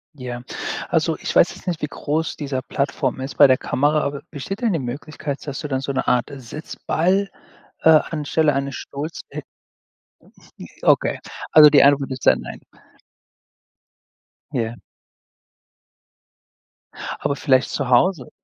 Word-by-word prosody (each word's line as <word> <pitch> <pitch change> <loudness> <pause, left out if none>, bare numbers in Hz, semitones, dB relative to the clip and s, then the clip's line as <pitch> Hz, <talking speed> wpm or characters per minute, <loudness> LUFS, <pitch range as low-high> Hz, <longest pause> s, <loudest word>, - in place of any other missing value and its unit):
Ja, 125 -2 -6 0.5
also, - - +1
ich - - -4
weiß - - +4
jetzt - - -16
nicht, 170 -3 -2
wie 150 - -1
groß 155 +3 -2
dieser 140 -3 -3
Plattform 135 -1 -2
ist 135 - -6
bei 145 - +8
der 130 -1 +4
Kamera, 150 +3 +1
aber 140 0 -3
besteht 150 +9 -6
denn 225 -5 +1
die 165 - 0
Möglichkeit, 140 +3 -6
dass 140 - -4
du 150 - -5
dann 130 -1 0
so 135 +1 -4
'ne 130 - -1
Art 125 +2 +1
Sitzball, 160 - -2 0.5
äh, - - +3
anstelle 155 -1 +2
eines 140 -1 -2
Stuhls 150 +4 -6
hi - - -4 1.4
Okay, - - +2 0.3
also 150 -1 +9
die 145 -2 +6
Antwort 140 -1 +3
ist 130 -1 -6
dann: - - +5
„Nein.“ - - -9 1.9
Ja. 115 0 -2 2.4
Aber 140 - -1
vielleicht 130 -3 +2
zu 135 -3 -3
Hause? 130 +2 +2
140 Hz, 140 wpm, -21 LUFS, 130-155 Hz, 2.4 s, also